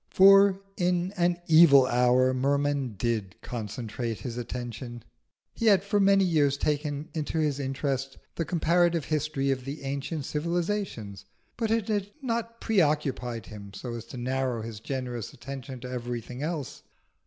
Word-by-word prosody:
For 195 0 +7 0.2
in 180 0 +1
an 175 -1 +2
evil 155 -5 +7
hour 125 +1 +3
Merman 140 -2 0
did 110 -3 -2
concentrate 115 -1 -4
himself. 120 0 -5 0.5
He 230 - -1
had 195 -3 +5
for 205 +1 +1
many 195 0 +5
years 150 -6 +2
taken 150 0 -1
into 160 0 -3
his 150 -3 +1
interest 135 0 -2 0.2
the 165 - -2
comparative 170 -1 +2
history 150 -3 0
of 130 -1 -2
the 140 +2 -6
ancient 140 +2 -3
civilisations, 165 - -2 0.3
but 225 -2 -1
it 225 -2 +1
had 205 -2 -1
not 230 -3 -3
preoccupied 145 - 0
him 100 -2 -10
so 120 -2 -6
as 115 -1 -6
to 125 - -9
narrow 130 -2 -1
his 110 -2 -7
generous 125 -2 -4
attention 135 0 -8
to 125 0 -7
everything 125 0 -5
else. 155 -3 -4
140 Hz, 140 wpm, -28 LUFS, 125-175 Hz, 0.5 s, For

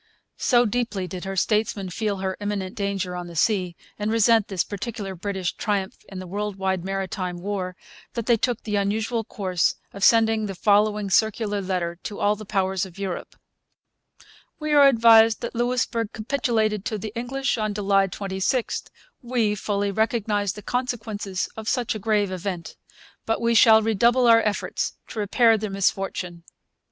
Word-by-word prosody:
So 245 -1 +4
deeply 220 -4 -2
did 180 +1 -7
her 195 0 -4
statesmen 210 -1 0
feel 210 +1 -2
her 190 0 -2
imminent 205 -2 -3
danger 200 -3 -2
on 175 0 -5
the 170 - -10
sea, 180 -1 +1 0.2
and 210 +1 -1
resent 225 -1 +4
this 190 -3 0
particular 205 -1 -5
British 190 0 -3
triumph 200 -3 -2
in 195 - -8
the 185 - -6
world 205 +2 -3
wide 190 -2 -1
'Maritime 190 -1 -3
War,' 185 -1 -3 0.4
that 235 -2 -3
they 235 - +4
took 240 +1 -1
the 210 -2 -1
unusual 220 +3 0
course 185 -5 0 0.2
of 200 - -6
sending 225 -1 +4
the 195 - -5
following 210 +1 +2
circular 215 0 +1
letter 180 -2 -2
to 205 - -6
all 205 +1 +2
the 215 -1 -11
Powers 190 -2 0
of 190 -2 -8
Europe: 195 -3 -5 1.2
We 305 -1 -1
are 285 -1 +8
advised 225 -3 +6
that 235 - -4
Louisbourg 235 -2 -1
capitulated 220 -3 0
to 215 - -2
the 215 +1 -6
English 260 +2 -1
on 215 -1 0
July 195 -1 +2
26, 195 +5 -2 0.4
We 235 -4 0
fully 205 0 -1
realize 210 -2 0
the 210 - -10
consequences 220 -6 -3
of 220 0 -4
such 245 -3 0
a 215 - -5
grave 210 -2 +1
event. 180 -2 -5 0.5
But 225 - +1
we 235 0 +1
shall 220 0 +7
redouble 235 +3 +3
our 230 -1 +7
efforts 210 -2 -2 0.2
to 220 - -6
repair 225 +2 +3
the 215 0 -3
misfortune. 195 -3 -2
210 Hz, 165 wpm, -24 LUFS, 190-225 Hz, 1.2 s, are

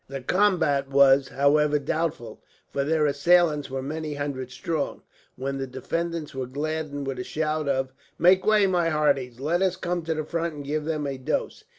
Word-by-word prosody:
The 135 0 -6
combat 145 -5 +2
was, 135 -1 +5
however, 150 +2 +3
doubtful, 145 -6 -3 0.3
for 140 - -1
their 155 +1 +2
assailants 150 +1 +3
were 135 0 -4
many 155 +1 -4
hundred 140 -3 -4
strong; 145 +4 -3 0.3
when 135 +1 -4
the 135 - -3
defenders 165 +5 -4
were 130 -1 -4
gladdened 145 +1 -3
with 135 -1 -4
a - - -2
shout 155 0 -2
of 130 -1 -1 0.2
"Make 185 +2 +5
way, 215 -2 +4
my 175 -3 +2
hearties. 140 -6 0
Let 165 +6 0
us 190 -1 +2
come 175 -1 -2
to 160 -1 -1
the 155 - -2
front, 165 0 -3
and 145 -1 -8
give 150 +1 -2
them 155 -2 -2
a 135 -2 -4
dose." 130 - -3
150 Hz, 185 wpm, -25 LUFS, 135-165 Hz, 0.3 s, was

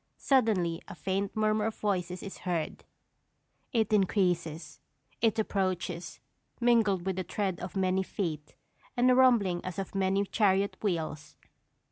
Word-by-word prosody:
Suddenly 205 -11 +2
a - - -8
faint 190 +3 -2
murmur 215 0 +2
of 225 - -3
voices 180 -3 -2
is 195 - -8
heard; 170 -4 -3 0.9
it 220 -3 +1
increases, 180 -5 0 0.4
it 225 -2 +2
approaches, 185 -4 -2 0.4
mingled 225 -7 +3
with 190 -1 -1
the 185 - -1
tread 190 0 -2
of 180 +2 -7
many 190 0 +2
feet, 160 -6 -4 0.4
and 250 +1 +5
a - - +5
rumbling 225 -9 +4
as 185 -2 -5
of 195 -1 -4
mighty 195 0 +1
chariot 200 0 +2
wheels. 160 -6 -3
190 Hz, 135 wpm, -30 LUFS, 175-215 Hz, 0.9 s, and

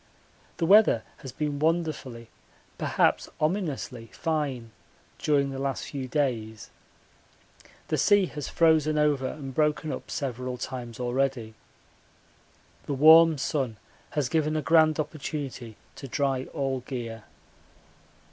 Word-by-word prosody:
The 165 - 0
weather 195 - +5
has 135 - -9
been 145 0 -3
wonderfully, 155 -8 -1 0.5
perhaps - - +1
ominously, 150 - -2
fine 140 -6 -3 0.5
during 140 -2 +1
the 135 - -5
last 135 0 -2
few 135 -3 -5
days. 120 -6 -2 1.2
The - - 0
sea 205 -2 +4
has 150 -4 -6
frozen 155 -2 +3
over 145 -3 +2
and 135 -2 -7
broken 150 +1 0
up - - -7
several 125 -2 -4
times 120 -2 -6
already. 125 -2 -1 1.3
The 140 - -1
warm 160 +2 +7
sun 130 -5 -2 0.4
has 145 -4 +2
given 155 +1 0
a 155 - -2
grand 160 -1 +4
opportunity 140 -6 -5 0.2
to 135 - -8
dry 135 0 -1
all 135 -2 -2
gear. 120 -4 -6
140 Hz, 120 wpm, -27 LUFS, 125-155 Hz, 1.3 s, warm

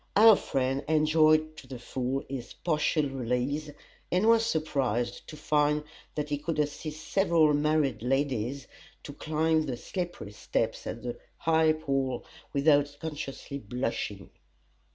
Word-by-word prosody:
Our 220 +1 +9
friend 135 -3 -1
enjoyed 155 0 +4
to 130 - -11
the 130 -1 -7
full 130 +2 -3
this 130 -3 -6
partial 155 -2 +1
release, 135 +3 -2 0.4
and 185 +4 +2
was 230 0 +5
surprised 135 - -1
to 155 - -9
find 150 0 +2 0.3
that 150 -1 -2
he 145 -1 -1
could 155 +1 -3
assist 150 +1 -3
several 170 -6 +4
married 145 -5 +1
ladies 135 0 -1 0.4
to 145 - -8
climb 155 +1 +1
the 125 -3 -3
slippery 175 - -5
steps 110 +1 -2
at 115 - -5
the 120 -1 -5 0.2
High 160 -1 +3
Pall 135 -5 -2 0.3
without 145 0 +3
consciously 145 -3 -5
blushing. 110 -4 -4
145 Hz, 130 wpm, -29 LUFS, 130-155 Hz, 0.4 s, Our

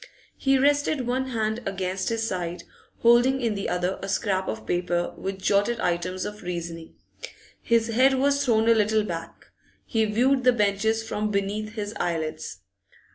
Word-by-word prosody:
He 270 0 +2
rested 285 0 +2
one 260 +2 -1
hand 220 -2 -1
against 190 -1 -2
his 225 -1 -1
side, 175 -2 -4 0.4
holding 240 +3 +5
in 230 -4 0
the 200 -1 -3
other 180 +1 -1
a 195 - -5
scrap 190 -2 0
of 110 0 -4
paper 175 +3 -1
with 190 0 -4
jotted 205 +4 +1
items 180 0 -1
of 210 0 -7
reasoning. 170 -2 -6 0.7
His 230 0 +2
head 260 +4 +4
was 280 +1 +2
thrown 225 -4 +2
a 230 - +7
little 215 0 +2
back; 170 -4 -7 0.3
he 225 -2 +1
viewed 250 +5 +2
the 250 0 +5
benches 220 +1 +1
from 215 -1 -2
beneath 210 +2 -2
his 210 -1 -4
eyelids. 160 - -3
210 Hz, 160 wpm, -25 LUFS, 185-235 Hz, 0.7 s, a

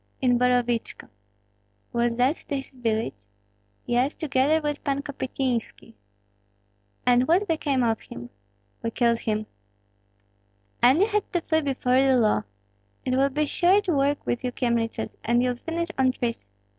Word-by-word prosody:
"In 245 -2 +2
Borovichko." 245 -2 0 0.8
"Was 235 0 +1
that 255 +5 +2
his 275 -2 -4
village?" 225 - -1 0.7
"Yes, 250 +4 +1
together 290 +1 +2
with 295 -1 -3
Pan 280 -1 -1
Kopystynski." 260 -5 -3 1.1
"And 250 +1 +4
what 370 +5 +3
became 290 -6 0
of 225 -2 0
him?" 120 0 -10 0.5
"We 230 - -1
killed 235 0 +1
him." 215 -1 -2 1.4
"And 260 +8 +5
you - - +6
had 420 -2 -1
to 350 - +1
flee 315 -1 +1
before 260 -2 +1
the 270 -1 +4
law. 210 - +2 0.6
It 255 - +1
will 275 +1 +3
be 300 +3 0
short 375 +7 +3
work 285 -2 +1
with 240 - -2
you 250 - -1
Kyemliches, 235 -3 -2
and 240 +2 +2
you'll 250 -1 0
finish 335 +5 -3
on 260 -1 +3
trees. 230 - -3
255 Hz, 145 wpm, -25 LUFS, 240-290 Hz, 1.4 s, you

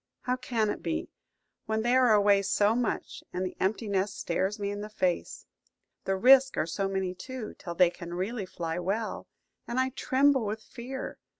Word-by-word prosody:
How 250 - 0
can 230 -4 0
it - - -6
be, - - -3 0.6
when 220 0 0
they 240 +2 +3
are 255 -3 +5
away 205 -1 +5
so 205 +2 +2
much, 245 -2 -2
and 180 +1 -2
the 185 - -5
empty 215 +4 0
nest 200 0 0
stares 190 +5 -1
me 200 -1 -2
in 205 0 -5
the 210 - -6
face? 185 -5 -2 0.6
The 195 - +1
risks 265 +6 +6
are - - +2
so 180 +4 -2
many 190 -1 -1
too, 245 +4 -7
till 170 -1 -6
they 180 -1 +5
can 175 0 -8
really 195 +2 -3
fly 165 -1 -4
well, 200 +5 -2 0.4
and 240 - -1
I 260 0 +2
tremble 265 0 +2
with 215 +1 -3
fear. 260 +2 -7
210 Hz, 190 wpm, -29 LUFS, 190-245 Hz, 0.6 s, risks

